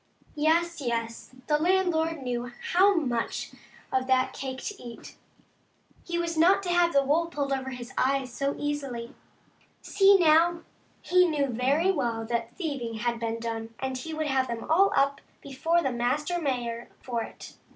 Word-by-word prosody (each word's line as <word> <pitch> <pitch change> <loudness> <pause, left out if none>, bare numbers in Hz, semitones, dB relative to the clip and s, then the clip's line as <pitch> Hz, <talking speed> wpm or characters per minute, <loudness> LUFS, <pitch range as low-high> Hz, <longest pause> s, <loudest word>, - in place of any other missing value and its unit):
Yes, 330 +2 +1
yes, 230 0 -4
the 300 +2 +2
landlord 330 -3 +1
knew 245 -1 -3 0.2
how 390 +3 +5
much 245 -8 -2 0.4
of 260 0 +1
that 260 -1 +2
cake 265 -1 -5
to 415 - -6
eat. 235 -1 -10 0.9
He 345 -1 -3
was 340 -1 -2
not 365 +5 +4
to 360 - -3
have 350 -1 +3
the 280 -2 +3
wool 310 +5 +2
pulled 285 -4 -2
over 265 0 -3
his 250 -1 -8
eyes 265 -1 0
so 275 +3 -1
easily. 275 -5 -4 0.7
See, 395 0 +5
now, 335 0 +4 0.4
he 360 0 +4
knew 300 -4 +1
very 275 +10 +2
well 235 -9 -2
that 235 0 -3
thieving 275 -10 -4
had 235 +1 -2
been 230 0 -2
done, 225 0 -5
and 265 0 -3
he 255 +6 -6
would 310 0 -2
have 265 -2 +1
them 235 -1 -4
all 390 +5 +5
up 280 0 +2 0.2
before 325 +5 0
the 270 - 0
master 295 +9 -1
mayor 240 -5 -3
for 240 -3 -2
it. - - -9
275 Hz, 165 wpm, -27 LUFS, 240-335 Hz, 0.9 s, how